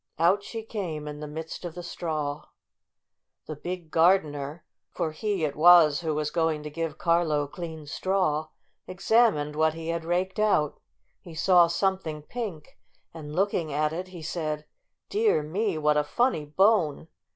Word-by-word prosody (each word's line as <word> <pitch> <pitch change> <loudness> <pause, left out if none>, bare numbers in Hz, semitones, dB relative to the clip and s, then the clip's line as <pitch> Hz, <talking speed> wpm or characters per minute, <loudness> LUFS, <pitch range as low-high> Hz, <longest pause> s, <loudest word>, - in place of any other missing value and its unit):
Out 180 +5 +3
she 225 +2 -6
came 175 -9 -5
in 150 0 -6
the 150 - -6
midst 160 +4 -7
of 175 -2 -6
the 175 - -7
straw. 155 -4 -4 1.0
The 155 - -6
big 175 +1 -6
gardener, 155 -3 +2 0.2
for 160 - -2
he 195 +1 -1
it 145 - -3
was 160 -2 +7
who 160 -3 -1
was 150 0 -1
going 160 -2 0
to 150 - -6
give 165 -1 -4
Carlo 165 -4 +2
clean 160 +1 -8
straw, 160 -1 0 0.4
examined 185 -6 +2
what 155 0 +2
he 165 0 -6
had 165 0 -2
raked 180 +4 -1
out. 200 -9 +2 0.4
He 170 -4 -12
saw 175 +1 +5
something 170 -3 -1
pink, 200 -6 -7 0.3
and, 150 -2 -8
looking 180 -4 0
at 150 +2 0
it, 180 +3 -4
he 180 -3 -10
said: 155 -2 -3 0.4
"Dear 425 - +2
me, 190 +4 -1
what 150 -1 +2
a 150 - +3
funny 200 - 0
bone! 165 -1 +2
160 Hz, 160 wpm, -27 LUFS, 150-185 Hz, 1.0 s, was